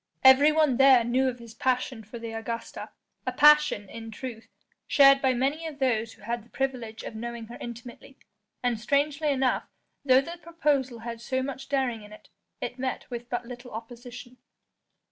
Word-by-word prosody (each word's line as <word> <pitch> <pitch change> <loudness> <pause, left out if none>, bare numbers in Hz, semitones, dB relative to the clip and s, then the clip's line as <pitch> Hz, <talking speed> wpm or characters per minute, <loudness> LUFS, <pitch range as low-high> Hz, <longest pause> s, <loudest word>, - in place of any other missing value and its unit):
Everyone 285 +1 +6
there 265 -3 +7
knew 255 +3 +1
of 250 - -6
his 235 -2 -12
passion 250 -1 -1
for 215 +3 -9
the 230 -1 -6
Augusta, 225 +1 -5 0.4
a - - +1
passion, 300 -8 +5
in 225 +2 -9
truth, 225 0 -8 0.4
shared 275 -1 +6
by 260 -1 +2
many 280 +6 -1
of 305 -3 -8
those 230 -5 0
who - - -20
had 235 +2 -3
the 235 - -22
privilege 245 -5 -3
of - - -7
knowing 235 +1 -6
her 240 - -8
intimately, 240 +3 -9 0.5
and 245 -3 0
strangely 285 +5 +1
enough 265 -2 +1 0.4
though 260 -2 +6
the 340 +5 -8
proposal 290 -8 -1
had 230 0 -6
so 260 +2 -1
much 270 0 -6
daring 260 -5 0
in 210 0 -13
it, 215 - -15 0.3
it 250 - -5
met 260 0 -4
with 240 0 -6
but 245 -1 -3
little 245 +1 -9
opposition. 240 +2 -9
250 Hz, 175 wpm, -27 LUFS, 235-275 Hz, 0.5 s, there